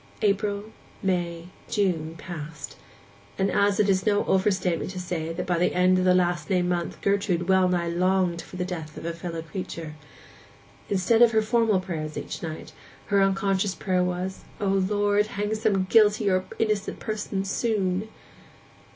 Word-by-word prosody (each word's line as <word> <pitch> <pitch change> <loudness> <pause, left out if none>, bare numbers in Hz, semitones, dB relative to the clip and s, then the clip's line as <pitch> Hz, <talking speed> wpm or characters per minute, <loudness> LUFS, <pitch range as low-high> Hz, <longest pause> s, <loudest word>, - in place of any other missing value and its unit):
April, 205 +1 0 0.3
May, 175 -2 -1 0.2
June, 170 -6 0
passed; 150 -4 -7 0.6
and 195 - +1
it 205 0 +3
is 190 -1 +2
no 205 -2 +2
overstatement 190 -3 +1
to 185 -1 -6
say 170 -3 -3
that 165 - -4
by 175 -2 0
the 180 - +1
end 185 +1 +4
of 185 - +1
the 180 0 +5
last 175 -3 +1
named 180 -2 +2
month 175 -1 -2
Gertrude 200 -3 +1
well 190 -1 +4
nigh 175 -1 0
longed 180 0 +1
for - - -12
the 180 0 -2
death 160 -4 -6
of - - -7
a 170 - -2
fellow 165 -1 -5
creature. 165 -2 -6 1.0
Instead 200 +4 +2
of 235 -1 +7
her 220 - +4
formal 225 -3 +2
prayers 160 -5 -5
each - - -5
night, 160 -2 -6 0.4
her 200 -1 +4
unconscious 195 0 +1
prayer 185 -2 0
was, 180 +1 -3 0.2
'O 200 -2 0
Lord, 205 +2 +2
hang 210 0 -2
some 215 -3 +1
guilty 210 0 +4
or 185 0 +1
innocent 215 -2 -1
person 210 -3 -3
soon! 200 -1 0
185 Hz, 160 wpm, -26 LUFS, 175-205 Hz, 1.0 s, of